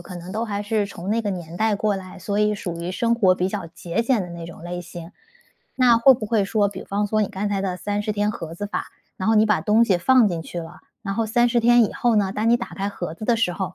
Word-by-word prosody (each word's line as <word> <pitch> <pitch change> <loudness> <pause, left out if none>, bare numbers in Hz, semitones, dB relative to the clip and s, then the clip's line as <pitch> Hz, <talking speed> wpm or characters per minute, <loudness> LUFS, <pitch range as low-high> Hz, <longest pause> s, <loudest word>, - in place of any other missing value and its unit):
可 180 +1 -9
能 175 +2 -8
都 225 +2 -2
还 205 -2 -3
是 210 -1 0
从 190 0 -6
那 230 +1 +1
个 210 - -3
年 175 -3 -6
代 220 0 +2
过 205 0 0
来， 185 -1 -9
所 205 0 -2
以 210 0 +2
属 175 -4 -5
于 175 +2 -3
生 235 +5 +1
活 190 -6 +4
比 185 - -1
较 195 -4 -4
节 170 +5 -3
俭 230 -3 +1
的 180 - -7
那 170 -1 -7
种 170 -1 -11
类 175 +1 -5
型。 170 -1 -9 0.7
那 245 -3 +5
会 265 +3 +7
不 230 - -5
会 215 -2 +1
说 205 -1 +2
比 200 - -8
方 205 +1 -1
说 215 +1 0
你 205 - -1
刚 205 0 -3
才 195 - 0
的 185 -2 -2
30 205 +2 -2
天 205 0 0
盒 165 -5 -7
子 205 +4 -4
法， 205 - -4 0.3
然 190 - -1
后 225 - +4
你 215 0 +5
把 210 -7 +2
东 215 +7 +4
西 190 -6 +2
放 250 +4 +5
进 170 -2 -3
去 175 - -7
了， 165 - -11 0.2
然 195 -3 -3
后 225 +2 0
30 240 +2 +2
天 240 0 +5
以 - - -3
后 240 -2 +1
呢， 195 -2 +1
当 215 +2 0
你 240 - +5
打 235 - -6
开 195 +1 -4
盒 175 -5 -5
子 215 - -8
的 235 - +3
时 225 -6 +1
候， 185 +1 -4
205 Hz, 295 characters per minute, -23 LUFS, 180-220 Hz, 0.7 s, 会